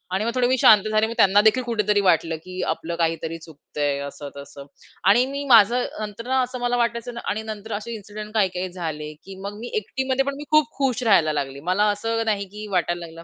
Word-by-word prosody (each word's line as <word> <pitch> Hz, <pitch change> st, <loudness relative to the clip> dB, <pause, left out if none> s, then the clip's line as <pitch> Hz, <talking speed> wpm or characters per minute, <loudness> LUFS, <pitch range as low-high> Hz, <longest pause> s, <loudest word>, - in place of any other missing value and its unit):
आणि 205 Hz, +3 st, 0 dB
मग 235 Hz, -, 0 dB
थोडे 250 Hz, -1 st, +3 dB
मी 255 Hz, +1 st, +2 dB
शांत 210 Hz, -4 st, +7 dB
झाले. 215 Hz, +1 st, +3 dB
मग 230 Hz, -, -5 dB
त्यांना 200 Hz, +1 st, +5 dB
देखील 220 Hz, +4 st, +3 dB
कुठेतरी 210 Hz, -4 st, +1 dB
वाटलं, 165 Hz, -3 st, +2 dB
की 185 Hz, 0 st, -6 dB
आपलं 165 Hz, +1 st, -3 dB
काहीतरी 165 Hz, -1 st, -1 dB
चुकतंय 145 Hz, -2 st, -4 dB
असं-तसं 140 Hz, -1 st, -10 dB, 0.4 s
आणि 240 Hz, +5 st, +5 dB
मी 280 Hz, +2 st, -4 dB
माझं 235 Hz, +1 st, +6 dB
नंतर 215 Hz, +2 st, -6 dB
ना, 260 Hz, 0 st, +2 dB
असं 255 Hz, 0 st, -4 dB
मला 245 Hz, -, 0 dB
नाला 245 Hz, -, +1 dB
वाटायचं 235 Hz, 0 st, -1 dB
ना 235 Hz, -, -6 dB
आणि 220 Hz, +2 st, -2 dB
नंतर 220 Hz, 0 st, -6 dB
असे 215 Hz, +3 st, -5 dB
इन्सिडेंट 210 Hz, 0 st, -9 dB
काही-काही 185 Hz, -4 st, 0 dB
झाले, 155 Hz, -4 st, -5 dB
की 195 Hz, -, -10 dB
मग 205 Hz, +1 st, -6 dB
मी 235 Hz, -, -6 dB
एकटीमध्ये 265 Hz, -8 st, -1 dB
पण 280 Hz, 0 st, -2 dB
मी 290 Hz, -, -7 dB
खूप 305 Hz, -1 st, +4 dB
खुश 255 Hz, -3 st, 0 dB
राहायला 170 Hz, -9 st, +4 dB
लागली. 140 Hz, -2 st, -3 dB
मला 200 Hz, +3 st, +3 dB
असं 225 Hz, +2 st, -2 dB
नाही, 205 Hz, -2 st, 0 dB
की 210 Hz, +2 st, -8 dB
वाटायला 175 Hz, -1 st, -1 dB
लागलं, 165 Hz, 0 st, -12 dB
210 Hz, 220 wpm, -23 LUFS, 175-235 Hz, 0.4 s, शांत